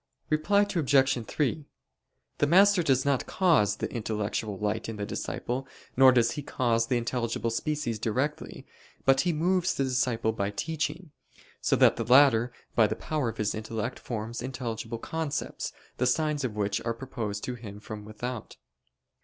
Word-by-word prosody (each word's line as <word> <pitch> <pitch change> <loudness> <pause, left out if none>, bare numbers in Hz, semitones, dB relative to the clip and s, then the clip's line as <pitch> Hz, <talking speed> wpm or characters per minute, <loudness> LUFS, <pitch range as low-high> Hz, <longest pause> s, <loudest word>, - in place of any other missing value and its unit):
Reply 180 +7 +3
Obj. 135 - +2
3: 150 0 -1 0.7
The 145 - +3
master 195 +3 +6
does 135 -5 +2
not 140 -2 +1
cause 155 - +3
the - - -4
intellectual 105 -2 -2
light 105 +3 -2
in 115 - -4
the 105 -1 -3
disciple, 125 +5 -4 0.3
nor 130 0 +8
does 120 -2 +3
he 145 - -4
cause 115 -4 0
the 125 - +1
intelligible 115 -1 -1
species 145 -3 -2
directly: 130 +7 -2 0.4
but 135 0 +5
he 180 - +1
moves 180 +3 +1
the 140 - +1
disciple 125 -4 +1
by 100 -2 -2
teaching, 155 - -3 0.5
so - - +2
that - - +5
the 115 - -1
latter, 125 -1 +5 0.2
by 110 -2 +5
the - - -2
power 150 -6 -2
of - - -7
his 105 -1 0
intellect, 110 0 -4
forms 115 0 -5
intelligible 120 -3 -4
concepts, 160 +4 -3 0.3
the 125 - +1
signs 150 +2 +1
of 120 -5 -2
which 105 0 -1
are 115 0 -2
proposed 115 -5 -5
to 125 - -3
him 105 -4 -9
from 105 0 -8
without. 110 +2 -6
125 Hz, 160 wpm, -28 LUFS, 110-145 Hz, 0.7 s, nor